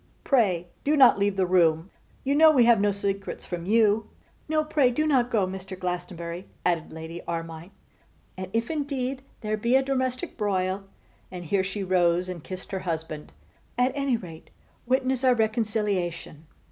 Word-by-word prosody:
Pray, 195 - +2 0.2
do 300 +2 +2
not 260 -7 +7
leave 200 0 +1
the 190 -1 +2
room. 170 -1 +2 0.3
You 275 - +1
know 315 +2 +7
we 260 -6 +5
have 235 -3 +5
no 205 - +3
secrets 200 0 -3
from 175 -1 -5
you.' 220 0 +3 0.4
'No, 310 0 +2
pray 300 -4 +3
do 305 +6 0
not 260 -5 +2
go, 215 -6 +2
Mr. 190 0 -7
Glastonbury,' 175 -1 -5 0.2
added 170 -3 0
Lady 160 +2 -7
Armine: 165 0 -5 0.7
'and 185 0 -5
if 230 +5 -1
indeed 275 -3 -2 0.2
there 215 0 -1
be 235 +4 +1
a 270 - +4
domestic 260 -2 -2
broil,' 195 -2 -1 0.5
and 180 -1 -7
here 190 +4 +1
she 195 +1 -4
rose 180 -1 +2
and 175 -4 -6
kissed 185 +1 -8
her 190 - -2
husband, 160 -4 -5 0.5
'at 250 +1 +3
any 275 -3 0
rate 165 -6 -11 0.4
witness 260 0 +1
our 255 -1 +5
reconciliation. 210 -8 -1
200 Hz, 165 wpm, -26 LUFS, 180-250 Hz, 0.7 s, not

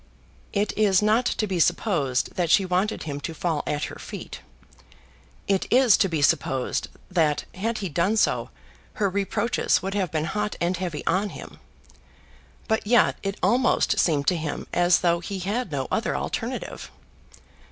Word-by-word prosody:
It 205 +1 -1
is 205 -2 +3
not 220 +4 +3
to 215 - 0
be 190 -4 -2
supposed 165 - +1
that 175 -2 -1
she 195 - +5
wanted 185 +4 0
him 145 -2 -4
to 160 +3 -6
fall 160 -3 -1
at 145 0 -1
her - - -5
feet. - - -8 1.1
It 195 -1 +1
is 250 -5 +6
to 195 - +2
be 160 -4 -1
supposed 130 -2 +1 0.2
that 160 -5 +1
had 220 +4 -2
he - - 0
done 180 +8 +1
so - - +1 0.4
her 200 -3 0
reproaches 200 +4 0
would 195 +1 -3
have 195 -4 0
been 155 0 -1
hot 210 +5 -2
and 175 +2 0
heavy 175 -4 -4
on 195 +4 +1
him; - - -10 1.1
but 220 -2 0
yet 240 0 +4
it 195 -1 -3
almost 240 +7 +2
seemed 145 -4 +2
to 180 - 0
him 155 -2 -4
as 175 0 +4
though 170 -1 +2
he 195 +3 -5
had 200 +3 -2
no 135 -3 -2
other - - 0
alternative. - - -4
185 Hz, 165 wpm, -25 LUFS, 165-210 Hz, 1.1 s, is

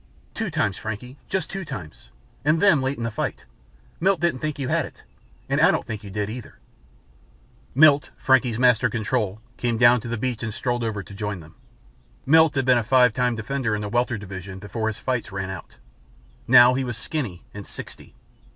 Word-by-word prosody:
"Two 225 -3 -3
times, 105 - 0
Frankie. 110 +6 -6
Just 190 -4 -2
two 195 0 -4
times. 80 - -9 0.3
And 155 +3 +3
them 170 -8 +5
late 135 +2 -1
in 115 - -4
the 115 - -2
fight. 110 - -4 0.5
Milt 190 0 +2
didn't 170 -5 0
think 155 0 -3
you 135 -2 -3
had - - +1
it, - - -12 0.4
and - - +1
I - - +7
don't - - 0
think 110 -1 -6
you 100 - -8
did 105 +1 -2
either." 115 +2 -8 1.2
Milt, 145 -1 +6
Frankie's 125 -3 +2
master 125 -1 +4
control, 110 -2 -2 0.2
came 120 -2 -1
down 120 0 +6
to - - -7
the 120 0 -2
beach 125 0 -2
and 110 -2 -4
strolled 120 -1 -1
over 105 -3 -3
to 100 - -13
join 105 -1 -4
them. 80 0 -14 0.7
Milt 160 +1 +5
had 135 -2 +1
been 125 -2 +5
a - - -2
Five 125 0 +4
Time 125 0 +1
Defender 115 0 -2
in 105 - -3
the 105 - -4
Welter 120 +1 0
division 95 -1 -8
before 110 +3 -4
his 110 -1 -2
fights 125 -5 -2
ran 95 -1 -4
out. 95 - -9 0.7
Now 125 0 +8
he 135 +1 0
was 120 -3 -4
skinny 125 - -4
and 100 -1 -8
sixty. - - -10
120 Hz, 200 wpm, -24 LUFS, 105-130 Hz, 1.2 s, Now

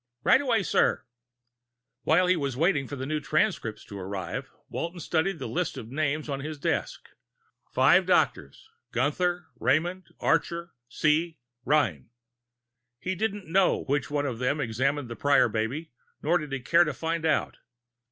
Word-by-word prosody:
"Right 265 - +5
away, 235 -7 +1
sir." - - +2 1.0
While 165 +6 +4
he 180 +1 +4
waited 140 0 0
for 145 - -4
the 130 -1 -4
new 155 +2 -1
transcripts 155 - -1
to 100 - -8
arrive, 95 0 -5 0.2
Walton 170 +1 -4
studied 165 +3 0
the - - -6
list 175 -4 -2
of 115 -2 -8
names 155 +1 -1
on 140 -2 -3
his 150 +2 -5
desk. 140 - -2 0.6
Five - - +5
doctors 70 - +1 0.2
Gunther, 175 +7 0
Raymond, 175 +6 +1
Archer, 170 +2 0
Hsi, 155 +6 +1 0.3
Rein. 120 - +1 0.9
He 185 +9 -3
didn't 205 0 -2
know 185 +3 +2
which 140 0 -1
one 145 0 0
of 125 -5 -3
them 130 +4 +1
had 145 - -1
examined 130 +4 -1
the 115 - -6
Prior 145 -1 +4
baby, 115 +9 -3 0.3
nor 170 +4 +3
did 150 -3 -7
he 135 -1 -3
care 170 +7 +5
to 150 -4 -3
find 165 +2 -2
out. 160 - +1
150 Hz, 155 wpm, -27 LUFS, 135-170 Hz, 1.0 s, Right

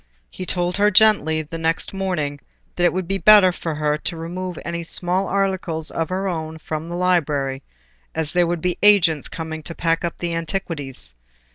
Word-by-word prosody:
He 185 - -7
told 180 0 0
her 205 +1 +4
gently, 185 -7 +4
the 165 +2 -7
next 165 +3 -1
morning, 175 -7 -2 0.4
that 175 - +1
it 175 - +4
would 185 -1 -3
be 195 +1 -1
better 205 -3 +7
for 165 -2 -5
her 150 0 0
to 170 - -4
remove 175 +2 -5
any 170 0 -3
small 180 +3 +1
articles 185 -5 -1
of 165 -1 -2
her 190 +1 -2
own 160 -3 -4
from 155 +1 -5
the 175 - -4
library, 145 -7 0 0.5
as 160 -1 -2
there 175 -1 +3
would 170 -1 -2
be 180 0 -1
agents 185 -8 +4
coming 160 -1 -6
to 165 +2 -7
pack 165 0 0
up 170 - -3
the 170 -1 -3
antiquities. 160 - -2
170 Hz, 185 wpm, -21 LUFS, 160-185 Hz, 0.5 s, better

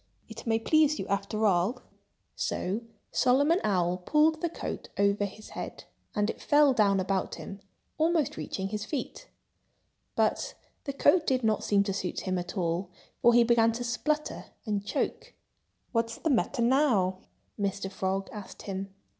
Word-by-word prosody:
"It 230 +1 -10
may 225 0 +3
please 305 +5 +3
you, - - -3
after 200 +2 0
all." 200 +6 +2 0.5
So 195 +5 -2 0.3
Solomon 285 +7 +3
Owl 180 -3 +1
pulled 305 - +2
the 340 - 0
coat 335 - -6
over 200 0 +2
his 210 +2 -9
head. - - -7 0.3
And 210 0 +2
it - - -4
fell 290 -2 +5
down 200 -4 +3
about 190 0 -1
him, 195 - -8 0.4
almost 320 -2 +2
reaching 190 0 -4
his 210 0 -3
feet. 295 - -5 0.9
But - - 0 0.3
the 280 - -3
coat 310 +4 +4
did 255 -2 +2
not 220 -1 +1
seem 200 -1 +3
to 195 -1 -2
suit 185 -2 -3
him 185 -2 -1
at 180 +3 -6
all, 175 +1 -1 0.3
for 235 0 +6
he 240 - +7
began 230 -1 +4
to 245 +2 -4
splutter 300 +6 -1 0.2
and 205 -3 -1
choke. 475 - -3 0.6
"What's 230 -1 0
the 320 - 0
matter 240 -1 +1
now?" 230 -8 +3 0.4
Mr. 195 -1 -2
Frog 190 0 -2
asked 210 -3 -9
him. 195 0 -5
220 Hz, 160 wpm, -29 LUFS, 195-270 Hz, 0.9 s, he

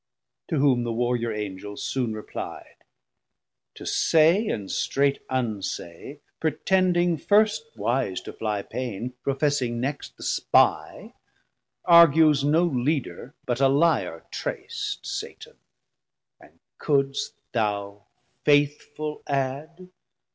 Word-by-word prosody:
To 160 - -1
whom 135 -3 +3
the 120 - -2
warriour 120 0 0
Angel 105 -1 -6
soon 120 -5 -2
repli'd. 105 - -8 0.9
To - - -10
say 165 +7 +3
and 100 - -3
strait 140 0 0
unsay, 115 - -4 0.2
pretending 175 +2 +1
first 205 - +2
Wise 110 -2 -1
to - - -9
flie 105 -2 -3
pain, 125 -1 -5
professing 135 -4 0
next 130 - -4
the - - -10
Spie, - - +1 0.7
Argues 160 -4 +6
no 155 +4 +3
Leader, 140 -1 -2
but 125 +1 -1
a 135 - +6
lyar 135 - +1
trac't, - - -4
Satan, - - -7 0.8
and - - -20 0.2
couldst 140 +7 0 0.2
thou 105 -3 -2 0.4
faithful 150 +1 +1
add? 145 +6 -3
135 Hz, 105 wpm, -25 LUFS, 115-155 Hz, 0.9 s, Argues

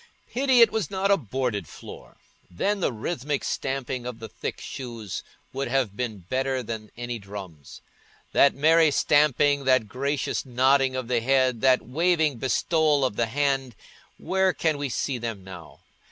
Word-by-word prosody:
Pity 260 -1 +3
it 230 - +7
was 220 -7 -2
not 195 +1 0
a - - +7
boarded 120 - -3
floor! - - -12 0.3
Then 200 - -1
the 175 - 0
rhythmic 135 +4 -3
stamping 130 -2 -3
of 125 -2 -6
the 115 -1 -8
thick - - -6
shoes 115 -7 -6 0.3
would 135 +1 -2
have 125 -5 0
been 110 -7 -4
better 130 +2 -1
than 110 -2 -6
any 120 -1 -4
drums. 95 -7 -10 0.5
That 140 - +4
merry 160 +2 +5
stamping, 145 -1 +3
that 130 -4 +3
gracious 140 +4 -2
nodding 130 +1 +2
of 130 -2 -3
the 120 -1 +1
head, 130 -1 +2
that 130 -1 +4
waving 160 -1 +1
bestowal 150 +2 +2
of 125 - -2
the 115 +1 0
hand—where 140 - -2
can 155 -3 0
we 145 -1 -2
see 130 0 -2
them 115 -4 -5
now? 90 -4 -12
130 Hz, 155 wpm, -25 LUFS, 115-145 Hz, 0.5 s, it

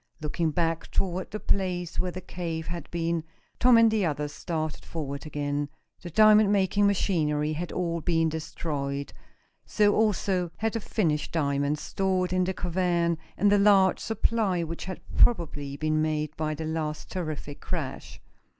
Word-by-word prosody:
Looking 155 +1 -1
back 165 0 -1
toward 185 -1 -1
the 215 - -5
place 180 -4 -1
where 180 - +1
the 185 +1 -6
cave 165 -3 -4
had 170 -2 -6
been, 170 -1 -1 0.4
Tom 245 -1 +6
and 230 -1 +6
the 215 -2 +1
others 150 -3 -1
started 155 -2 -4
forward 145 -2 -5
again. 145 -1 -2 0.3
The 175 - -7
diamond 215 +2 +6
making 200 0 +3
machinery 155 -6 +1
had 165 +2 -4
all 170 -2 -2
been 165 -1 +2
destroyed. 145 -3 -4 0.5
So, 205 -1 +3
also, 195 -4 +1
had 225 0 -1
the 230 - -1
finished 160 -8 -1
diamonds 145 -1 0
stored 185 -2 0
in 185 0 +2
the 190 - -1
cavern 170 -2 0 0.2
and 200 +2 +4
the 205 - +5
large 195 -2 +5
supply 220 -4 0
which 165 +1 -5
had 185 0 -6 0.2
probably 145 -10 +2
been 155 +1 +1
made 155 -1 -1
by 155 -1 -2
the 160 +1 -5
last 155 -1 -3
terrific 155 -5 -5
crash. - - -5
170 Hz, 160 wpm, -27 LUFS, 155-190 Hz, 0.5 s, Tom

